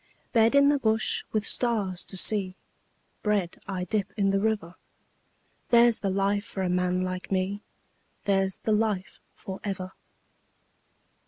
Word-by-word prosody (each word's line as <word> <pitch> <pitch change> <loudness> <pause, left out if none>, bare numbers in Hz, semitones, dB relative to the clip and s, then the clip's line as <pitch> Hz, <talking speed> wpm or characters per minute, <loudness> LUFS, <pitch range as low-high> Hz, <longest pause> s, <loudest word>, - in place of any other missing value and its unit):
Bed 230 +2 +4
in 280 0 +6
the 290 -1 +2
bush 220 -3 0
with 215 -1 -1
stars 205 -8 +1
to 190 - -3
see, 190 -1 +3 0.7
Bread 205 -5 -1
I 190 -2 -3
dip 200 +2 -2
in 195 -1 +2
the 195 - +2
river 205 -5 -1 1.0
There's 235 -1 +5
the 195 - -1
life 200 +1 0
for 190 -3 -5
a 180 - 0
man 180 0 +1
like 185 +1 -5
me, 195 +2 -1 0.6
There's 195 -1 +1
the 220 - -2
life 210 -3 -1
for 190 0 -8
ever. 190 -2 -4
200 Hz, 145 wpm, -27 LUFS, 185-220 Hz, 1.0 s, in